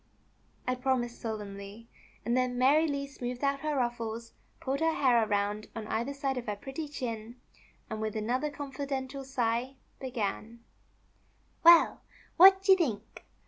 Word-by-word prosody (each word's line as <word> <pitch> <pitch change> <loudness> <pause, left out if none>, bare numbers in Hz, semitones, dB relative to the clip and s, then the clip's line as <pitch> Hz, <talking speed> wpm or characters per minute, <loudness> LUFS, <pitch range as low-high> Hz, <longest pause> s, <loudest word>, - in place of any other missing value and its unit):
I 255 - +2
promised 250 -2 -1
solemnly, 205 0 -6 0.4
and 235 - +1
then 255 -1 0
Mary 290 +6 +4
Lee 280 -1 -2
smoothed 250 -2 -6
out 275 0 +1
her 305 +1 -2
ruffles, 235 -2 -3 0.3
pulled 270 +1 -2
her 325 0 +1
hair 245 -4 +4
around 210 0 -1
on 225 -1 -5
either 235 +5 -2
side 275 -1 -2
of 240 - -9
her 210 - -1
pretty 270 +8 -6
chin, 235 -4 -6 0.5
and 220 -1 -5
with 220 0 -3
another 245 +7 -1
confidential 275 -1 -5
sigh 250 0 -1 0.2
began: 235 -2 -4 1.0
'^Well, 340 0 +7 0.4
what 385 +2 +8
you 385 - +9
think! 230 - -3
250 Hz, 145 wpm, -30 LUFS, 225-280 Hz, 1.0 s, you